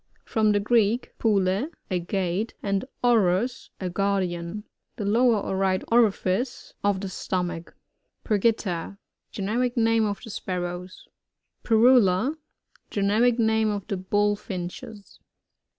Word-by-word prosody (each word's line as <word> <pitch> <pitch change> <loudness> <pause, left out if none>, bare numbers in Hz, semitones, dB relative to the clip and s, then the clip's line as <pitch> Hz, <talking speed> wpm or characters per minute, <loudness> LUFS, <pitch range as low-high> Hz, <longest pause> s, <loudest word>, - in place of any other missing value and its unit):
— - - -42
From 215 -1 +3
the 205 - +2
Greek, 225 +2 +1
pule, 200 +4 +1 0.2
a 180 - +1
gate, 185 +4 -2
and 200 +2 0 0.2
ouros, 230 0 +2
a 185 - -3
guardian. 185 0 -1 0.3
The 210 - -4
lower, 230 +2 +4
or 195 - -3
right 190 -1 +1
orifice 230 0 +1
of 200 -2 +1
the 195 - -3
stomach. 180 -2 -4 0.5
Ptrgita. 200 -4 0 0.2
— - - -55
Generic 235 +5 -1
name 225 -1 +3
of 200 -1 -3
the 225 - -8
Spar 185 -2 -3
rows. 175 +1 -7 0.6
Pyrrhula. 230 +1 +4 0.3
— - - -35
Greneric 215 +4 +2
name 220 -1 +2
of 205 -2 -3
the 195 - -3
Bullfinches. 200 0 -3
205 Hz, 130 wpm, -25 LUFS, 185-225 Hz, 0.6 s, lower